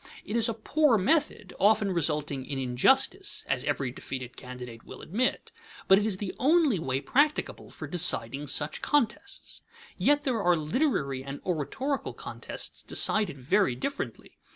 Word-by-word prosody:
It 210 - -4
is 230 0 +3
a 225 - -2
poor 285 +2 +3
method, 210 - 0
often 205 0 +4
resulting 150 -5 -1
in 135 +1 -5
injustice 265 - +1
(as - - 0
every 130 -3 -1
defeated 130 -1 -7
candidate 125 -2 -9
will - - -11
admit); 230 +9 -1 0.4
but 190 +1 +7
it 210 - 0
is 200 -4 -1
the 195 -1 -4
only 295 - +3
way 135 -4 -1
practicable 290 - 0
for - - -8
deciding 145 -5 +1
such 150 +2 -2
contests. 295 - -1 0.4
Yet 290 0 +3
there 245 -5 0
are 180 -2 +4
literary 155 - 0
and 140 +1 -7
oratorical 190 - -2
contests - - -6
decided 210 -9 +1
very 150 +2 +2
differently. 275 - -5
190 Hz, 150 wpm, -28 LUFS, -, 0.4 s, but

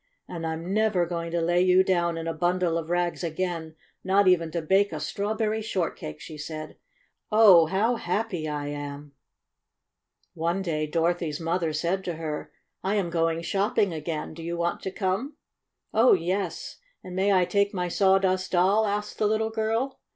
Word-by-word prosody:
"And 165 -2 -5
I'm 165 +3 -4
never 210 -4 +2
going 170 -1 -4
to 170 0 -1
lay 175 +2 +2
you 185 0 +5
down 175 -3 +1
in 165 0 -4
a 165 - -1
bundle 175 +1 0
of 165 -1 -3
rags 175 0 0
again, 165 -1 -3 0.3
not 195 +1 +3
even 170 -3 +4
to 170 - -2
bake 195 +5 +3
a 155 - -4
strawberry 215 +6 -1
shortcake!" 175 - -3
she 155 -1 -9
said. 155 0 -6 0.6
"Oh, 200 -7 +7
how 220 +7 +1
happy 180 -5 -2
I 145 -1 -3
am! 145 0 -7 0.4
' - - -59
' - - -59 0.2
One 170 +4 -1
day 155 -4 -1
Dorothy's 165 -1 0
mother 165 0 -1
said 170 +5 -1
to 175 - -3
her: 155 -2 -5 0.3
"I 195 +2 0
am 185 -5 0
going 165 0 0
shopping 200 0 +1
again. 155 0 -4
Do 165 - -10
you 170 +1 -4
want 170 0 -1
to 190 - -4
come?" 200 +10 -2 0.6
"Oh, 230 +3 +6
yes. 180 0 -2 0.3
And 180 - -8
may 195 +2 +2
I 185 -2 +4
take 200 +2 +1
my 180 -3 -2
Sawdust 190 0 +2
Doll?" 195 +5 +3
asked 210 +1 -3
the 215 - +3
little 220 +1 0
girl. 225 +4 -1
175 Hz, 180 wpm, -26 LUFS, 165-200 Hz, 0.6 s, Oh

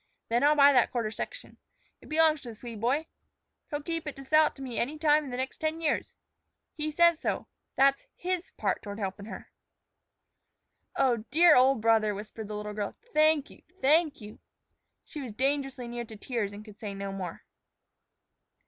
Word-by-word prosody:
Then 235 +3 +2
I'll 295 +1 +5
buy 285 -1 +7
that 250 -3 +4
quarter 230 -4 -1
section. - - -7 0.4
It - - -15
belongs 310 -1 +3
to 245 - -8
the 225 - -9
Swede 230 -1 -8
boy. 275 +7 +1 0.6
He'll 290 0 -4
keep 330 0 -3
it 295 - -4
to 275 - -10
sell 310 +3 +5
it - - -7
to 275 - -11
me 250 -3 -4
any 285 +6 -1
time 300 -1 +3
in - - -7
the 245 - -4
next 260 +1 -4
ten 315 +1 -1
years. 320 -2 -1 0.6
He 305 0 -3
says 340 +1 +4
so; - - -2 0.3
that's 275 0 +3
his 365 0 -3
part - - 0
toward 205 -1 -7
helpin' 200 -1 -4
her." - - -9 1.4
"Oh, 255 -3 +3
dear 335 +1 +6
old 260 -1 +4
brother," 220 -2 +3
whispered 215 +1 -7
the 210 - -5
little 210 0 -5
girl, 205 -1 -4 0.2
"thank 310 -1 +3
you! - - -16 0.2
thank 300 0 +3
you!" 210 0 -11 0.7
She 300 - -7
was 245 -5 -6
dangerously 270 0 -1
near 240 0 -5
to 220 - -11
tears 215 -2 -3
and 205 +1 -10
could 210 -1 -14
say 205 -3 -5
no 195 0 -4
more. 185 -3 -6
265 Hz, 190 wpm, -29 LUFS, 215-305 Hz, 1.4 s, buy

